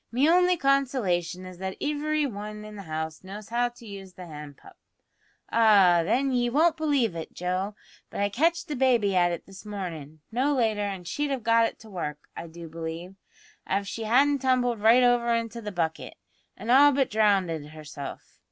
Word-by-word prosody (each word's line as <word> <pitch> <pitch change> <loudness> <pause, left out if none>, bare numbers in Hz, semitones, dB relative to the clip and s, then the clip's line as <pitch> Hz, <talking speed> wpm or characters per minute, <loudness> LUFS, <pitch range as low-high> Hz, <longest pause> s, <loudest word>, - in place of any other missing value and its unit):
Me 260 +5 +3
only 360 +1 +4
consolation 235 - 0
is 185 -1 -10
that 190 0 -4
ivery 300 +1 0
wan 210 -3 -6
in 215 0 -10
the 200 - -7
house 160 -1 -5
knows 200 +2 -9
how 240 +1 +1
to 240 -1 -16
use 195 -3 -9
the 185 -1 -10
hand 150 -3 -10
pump. - - -16 0.8
Ah, 200 -6 +5
then, 255 +9 +1
ye 245 -1 +1
won't 315 +6 +3
believe 285 - +1
it, 165 - -7
Joe, 185 +3 -2 0.3
but - - -7
I 200 - +2
catched 330 - +1
the 300 - -3
baby 240 -7 +2
at 175 -1 +3
it 170 - -5
this 195 -1 -12
mornin', 165 -8 -7
no 270 +5 +1
later, 220 -4 +1
an' 195 -3 -3
she'd 290 +12 -2
have 265 -4 -3
got 230 0 +4
it - - -9
to 220 - -13
work, 150 -5 -4 0.2
I 170 - -7
do 165 +1 -10
believe, 165 +3 -6 0.6
av 200 +1 0
she 225 +2 -5
hadn't 275 +5 +3
tumbled 250 -3 +1
right 230 +4 +5
over 240 -1 +3
into 230 0 -3
the 210 -1 -5
bucket, 165 -3 -3 0.4
an' 220 +5 -3
all 285 +3 +7
but 270 -1 +1
drownded 190 -8 +1
herself. 150 -2 -9
210 Hz, 190 wpm, -26 LUFS, 180-255 Hz, 0.8 s, all